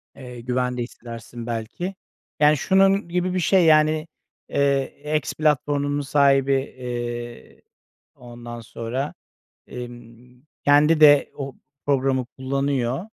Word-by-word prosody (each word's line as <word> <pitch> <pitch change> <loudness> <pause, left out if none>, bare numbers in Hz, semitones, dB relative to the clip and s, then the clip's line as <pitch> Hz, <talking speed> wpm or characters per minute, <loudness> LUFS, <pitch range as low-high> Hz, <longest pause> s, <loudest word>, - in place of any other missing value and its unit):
eee, 125 -2 -10
güvende 125 0 -1
hissedersin 115 0 -9
belki, 120 - -4 0.4
yani 150 0 +5
şunun 195 +3 +3
gibi 180 +1 -1
bir 185 - 0
şey, 180 0 +3
yani, 155 0 +4 0.4
eee, 140 +2 0
X 150 - -4
platformunun 145 -1 0
sahibi, 140 -1 +3
eee, 120 - -5 0.5
ondan 120 -1 -10
sonra, 120 +5 -4 0.5
emm, 120 0 -11 0.2
kendi 150 +2 +5
de 145 -2 +7
o 135 -2 -6 0.3
programı 135 -2 +1
kullanıyor, 135 +1 -1
135 Hz, 105 wpm, -23 LUFS, 120-150 Hz, 0.5 s, de